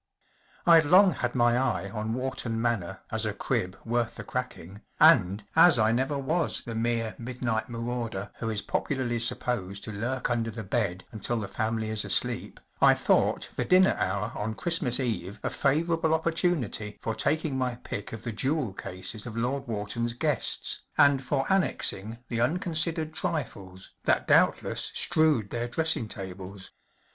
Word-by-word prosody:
Fd 165 Hz, -4 st, +6 dB
long 185 Hz, +2 st, +7 dB
had 125 Hz, -1 st, -3 dB
my 120 Hz, -1 st, +3 dB
eye 100 Hz, -7 st, -1 dB
on 110 Hz, +1 st, -3 dB
Wharton 125 Hz, -3 st, -2 dB
Manor 115 Hz, -6 st, -2 dB
as -, -, +1 dB
a -, -, -1 dB
crib 90 Hz, +1 st, -2 dB
worth 115 Hz, 0 st, -1 dB
the -, -, -7 dB
cracking, 105 Hz, -6 st, -6 dB, 0.2 s
and, 95 Hz, +3 st, +5 dB
as 165 Hz, -3 st, +7 dB
I 110 Hz, -1 st, +3 dB
never 130 Hz, +4 st, 0 dB
was 155 Hz, +5 st, -1 dB
the 115 Hz, -, -5 dB
mere 115 Hz, -1 st, -1 dB
midnight 115 Hz, -2 st, -3 dB
marauder 115 Hz, -4 st, -4 dB
who 115 Hz, -, -2 dB
is 105 Hz, -2 st, -2 dB
popularly 125 Hz, -4 st, -1 dB
supposed 110 Hz, -4 st, -2 dB
to -, -, -5 dB
lurk 120 Hz, +5 st, -2 dB
under 115 Hz, -1 st, 0 dB
the 110 Hz, 0 st, -6 dB
bed 95 Hz, -3 st, -2 dB
until 115 Hz, +2 st, -1 dB
the 105 Hz, -, -4 dB
family 110 Hz, +1 st, -2 dB
is 110 Hz, -1 st, 0 dB
asleep, -, -, -1 dB, 0.2 s
I -, -, +7 dB
thought -, -, +1 dB
the -, -, 0 dB
dinner 185 Hz, +1 st, +5 dB
hour 100 Hz, +4 st, -1 dB
on 110 Hz, +1 st, -3 dB
Christmas 160 Hz, -7 st, +2 dB
Eve 110 Hz, -5 st, -3 dB
a -, -, -1 dB
favourable 160 Hz, +3 st, +1 dB
opportunity 160 Hz, -, -1 dB
for 115 Hz, -, -3 dB
taking 145 Hz, +5 st, 0 dB
my 130 Hz, -2 st, -1 dB
pick 105 Hz, -3 st, -6 dB
of 115 Hz, -1 st, -8 dB
the 115 Hz, -, -3 dB
jewel 130 Hz, 0 st, 0 dB
cases 100 Hz, +4 st, -6 dB
of 115 Hz, -1 st, -7 dB
Lord 130 Hz, +4 st, -2 dB
Wharton’s 115 Hz, +2 st, -2 dB
guests, 120 Hz, -, 0 dB, 0.2 s
and 140 Hz, -2 st, +5 dB
for 135 Hz, +1 st, 0 dB
annexing 115 Hz, -, 0 dB
the 115 Hz, -1 st, -2 dB
unconsidered 160 Hz, +2 st, +1 dB
trifles 95 Hz, -, -5 dB
that -, -, +2 dB
doubt¬ -, -, +4 dB
less -, -, -2 dB
strewed 150 Hz, -10 st, +2 dB
their 120 Hz, 0 st, -2 dB
dressing 160 Hz, -2 st, +1 dB
tables. 95 Hz, -1 st, -7 dB
120 Hz, 160 wpm, -27 LUFS, 110-140 Hz, 0.2 s, long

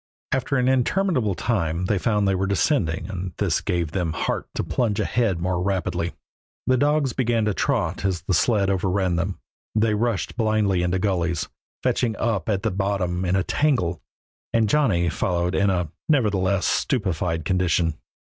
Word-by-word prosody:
After 135 Hz, +1 st, 0 dB
an 125 Hz, 0 st, +2 dB
interminable 130 Hz, -, +1 dB
time 90 Hz, -5 st, -1 dB
they 100 Hz, +1 st, +1 dB
found 105 Hz, -1 st, +1 dB
they 95 Hz, -, +2 dB
were 95 Hz, +1 st, 0 dB
descending 100 Hz, -, +1 dB
and 90 Hz, -3 st, -5 dB
this 95 Hz, -6 st, +1 dB
gave 85 Hz, -5 st, -1 dB
them 85 Hz, -3 st, -1 dB
heart -, -, -2 dB
to -, -, -1 dB
plunge 115 Hz, -5 st, 0 dB
ahead 110 Hz, -8 st, +1 dB
more 90 Hz, 0 st, -1 dB
rapidly. 90 Hz, -3 st, -1 dB, 0.5 s
The 130 Hz, -, +3 dB
dogs 145 Hz, -1 st, +2 dB
began 120 Hz, -4 st, +1 dB
to 105 Hz, -, +1 dB
trot 95 Hz, -, -1 dB
as 95 Hz, -6 st, -1 dB
the 95 Hz, -, -1 dB
sled 100 Hz, +3 st, +2 dB
overran 95 Hz, -1 st, 0 dB
them; 85 Hz, +3 st, -2 dB, 0.4 s
they 110 Hz, 0 st, +3 dB
rushed 115 Hz, 0 st, -1 dB
blindly 110 Hz, -5 st, +2 dB
into 90 Hz, +1 st, +1 dB
gullies, 90 Hz, -4 st, -1 dB, 0.3 s
fetching 115 Hz, -3 st, +1 dB
up 110 Hz, -4 st, -1 dB
at 100 Hz, -2 st, 0 dB
the -, -, +1 dB
bottom 95 Hz, -2 st, -1 dB
in 90 Hz, +1 st, +1 dB
a 95 Hz, -, +2 dB
tangle, 90 Hz, -, 0 dB, 0.5 s
and 115 Hz, -2 st, +2 dB
Johnny 105 Hz, -11 st, +2 dB
followed 90 Hz, +1 st, 0 dB
in 100 Hz, +1 st, +2 dB
a 90 Hz, -4 st, -1 dB, 0.2 s
nerveless, 100 Hz, -9 st, +2 dB
stupefied 90 Hz, -, 0 dB
condition. 85 Hz, -2 st, +1 dB
95 Hz, 165 wpm, -23 LUFS, 90-115 Hz, 0.5 s, The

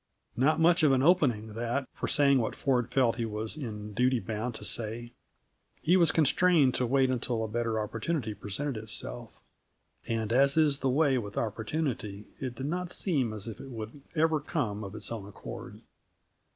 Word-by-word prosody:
Not 140 Hz, +7 st, +3 dB
much 170 Hz, +2 st, +5 dB
of 150 Hz, -3 st, +5 dB
an 130 Hz, 0 st, +3 dB
opening, 125 Hz, -11 st, +3 dB
that, 120 Hz, +4 st, -2 dB
for -, -, -4 dB
saying 140 Hz, -2 st, +4 dB
what 115 Hz, -, -2 dB
Ford 125 Hz, -3 st, +1 dB
felt 125 Hz, -2 st, +2 dB
he 115 Hz, -, -1 dB
was 110 Hz, +2 st, -1 dB
in 105 Hz, -7 st, -6 dB
duty 125 Hz, +3 st, +2 dB
bound 110 Hz, +2 st, -4 dB
to -, -, -6 dB
say. 120 Hz, +1 st, -2 dB, 0.7 s
He 175 Hz, -, +3 dB
was 170 Hz, -3 st, +5 dB
constrained 160 Hz, -3 st, +4 dB
to 125 Hz, -, 0 dB
wait 130 Hz, +1 st, +3 dB
until 120 Hz, -2 st, -1 dB
a -, -, -2 dB
better 115 Hz, 0 st, -1 dB
opportunity 115 Hz, +3 st, -2 dB
presented 110 Hz, +7 st, -4 dB
itself 110 Hz, 0 st, -6 dB, 0.7 s
and, 115 Hz, -1 st, -1 dB
as 140 Hz, +3 st, +4 dB
is 150 Hz, -3 st, +4 dB
the 135 Hz, -, +1 dB
way 135 Hz, -1 st, +3 dB
with 105 Hz, -3 st, -7 dB
opportunity, 110 Hz, -2 st, -2 dB
it 130 Hz, -2 st, -4 dB
did 130 Hz, -, -5 dB
not 175 Hz, +4 st, -2 dB
seem 145 Hz, -, 0 dB
as 110 Hz, 0 st, -4 dB
if 115 Hz, -, -7 dB
it 135 Hz, -, -9 dB
would 115 Hz, +3 st, -7 dB
ever 160 Hz, 0 st, +3 dB
come 125 Hz, -9 st, -2 dB
of 100 Hz, +1 st, -7 dB
its 110 Hz, +1 st, -3 dB
own 105 Hz, -4 st, -5 dB
accord. 100 Hz, -, -9 dB
125 Hz, 180 wpm, -29 LUFS, 110-145 Hz, 0.7 s, much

